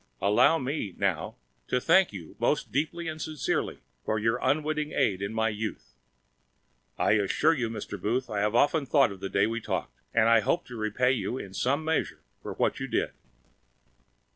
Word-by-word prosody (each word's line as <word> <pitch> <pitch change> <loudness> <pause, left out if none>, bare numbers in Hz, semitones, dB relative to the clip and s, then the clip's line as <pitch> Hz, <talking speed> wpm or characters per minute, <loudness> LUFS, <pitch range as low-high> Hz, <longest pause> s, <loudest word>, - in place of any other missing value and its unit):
Allow 105 +11 +4
me, 130 - -3
now, 95 -5 -1 0.3
to 125 - +1
thank 190 +8 +4
you 85 -6 -9
most - - 0
deeply 160 +6 -1
and 155 0 -5
sincerely 155 -4 -2 0.2
for 110 - 0
your 115 +3 +1
unwitting 150 0 0
aid 95 -2 +1
in 100 +1 -2
my 110 0 +1
youth. 105 - -5 1.0
I - - +2
assure 105 +10 +3
you, 125 -7 -1
Mr. 105 -3 -6
Booth, 120 +6 0
I 105 - -2
have 105 +2 +1
often 145 +3 +3
thought 135 -6 +4
of 95 - -9
that 95 - -4
day 100 - +4
we 115 +2 -2
talked. - - -4
And 115 -1 +3
I 115 0 +6
hope 170 +11 0
to 125 - -7
repay 110 +3 +1
you, 125 0 -2
in 95 -6 -8
some 140 +9 0
measure, 160 0 -1 0.2
for - - -6
what - - 0
you - - -3
did." - - 0
115 Hz, 185 wpm, -28 LUFS, 105-150 Hz, 1.0 s, I